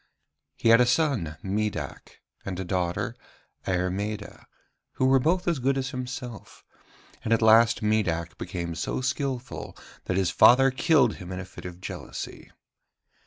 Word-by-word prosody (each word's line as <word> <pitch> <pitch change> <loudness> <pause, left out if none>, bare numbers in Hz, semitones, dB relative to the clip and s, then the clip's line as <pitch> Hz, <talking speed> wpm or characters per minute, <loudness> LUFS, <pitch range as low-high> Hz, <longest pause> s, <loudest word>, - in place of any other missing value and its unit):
He 115 - +1
had 115 +2 +7
a 125 - +4
son, 120 - +1
Midac, 105 +2 -4 0.2
and 95 -2 -5
a 95 - -3
daughter, 90 -1 -2 0.5
Airmeda, 95 +3 -3 0.5
who 130 - 0
were 135 0 +5
both 175 +7 +1
as 170 -5 +1
good 135 +2 +1
as 135 0 -2
himself; 125 -4 -7 0.6
and 110 - -3
at 115 0 +3
last 110 0 +5
Midac 90 -6 0
became 85 -2 -4
so 80 +9 -3
skilful 135 -1 -3 0.3
that 90 - -1
his 95 -2 +1
father 135 +8 +6
killed 130 - +3
him 90 0 -9
in 90 - -4
a 95 - -6
fit 90 - -12
of 90 0 -8
jealousy. - - -7
110 Hz, 150 wpm, -26 LUFS, 90-130 Hz, 0.6 s, had